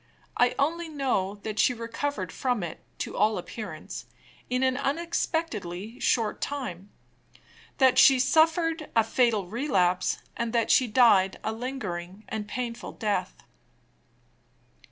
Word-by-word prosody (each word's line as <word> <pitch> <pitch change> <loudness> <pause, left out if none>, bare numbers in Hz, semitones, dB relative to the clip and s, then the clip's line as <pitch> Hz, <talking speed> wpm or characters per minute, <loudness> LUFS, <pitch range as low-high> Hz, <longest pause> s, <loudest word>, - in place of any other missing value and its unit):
I 245 0 +3
only 330 +4 0
know 255 -10 -1
that 215 -1 -4
she 250 - +4
recovered 230 -4 -3
from 245 -6 -1
it, 170 - -6 0.2
to - - -4
all 210 +1 +2
appearance, 215 +4 -7 0.4
in 250 +1 0
an 260 -1 +2
unexpectedly 260 - -2
short 225 -3 +1
time; 205 -10 -4 0.9
that 260 -2 +5
she 270 +1 +8
suffered 320 +4 +2
a 225 - +5
fatal 225 -3 +2
relapse, 185 -6 +1 0.2
and 235 0 -3
that 230 -2 +2
she 255 - +5
died 210 -5 +4
a 220 - -1
lingering 215 -6 -5
and 220 -1 -3
a - - -20
painful 240 +1 -5
death. 200 -5 -2
235 Hz, 130 wpm, -27 LUFS, 205-270 Hz, 0.9 s, she